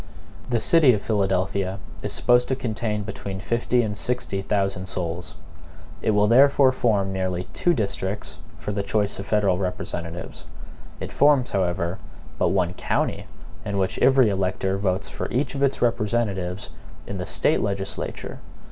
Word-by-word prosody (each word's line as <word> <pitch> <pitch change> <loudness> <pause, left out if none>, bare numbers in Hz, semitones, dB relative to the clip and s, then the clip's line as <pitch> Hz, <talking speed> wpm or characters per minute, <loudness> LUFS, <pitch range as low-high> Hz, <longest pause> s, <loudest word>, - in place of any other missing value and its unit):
The 120 -2 +2
city 150 -1 +5
of 105 - -1
Philadelphia 95 -2 0 0.2
is - - -3
supposed 120 0 +3
to 130 - 0
contain 110 -4 -2
between 100 -1 -6
fifty 120 +3 +1
and 105 -2 -2
sixty 115 -4 -2
thousand 95 -1 -1
souls. 85 -1 -4 0.7
It - - 0
will 105 -1 +4
therefore 135 +3 +6
form 105 -6 +1
nearly 95 -1 -1
two 175 -1 +2
districts 100 -2 -3 0.2
for - - -4
the 100 0 -1
choice 100 0 -1
of 100 - -6
federal 100 -4 +2
representatives. 85 -2 -5 0.5
It - - -6
forms, 140 -3 +4
however, 90 -2 -1 0.4
but - - +3
one 90 -2 +1
county, - - -1 0.4
in 100 -1 -3
which 95 -1 0
every 130 -3 +5
elector 95 0 -1
votes 95 -1 0
for - - -5
each 135 +5 -1
of 140 - -4
its 140 -2 +1
representatives 105 -5 -1 0.3
in - - -5
the - - -4
State - - +2
legislature. 100 -1 -4
100 Hz, 150 wpm, -24 LUFS, 95-120 Hz, 0.7 s, therefore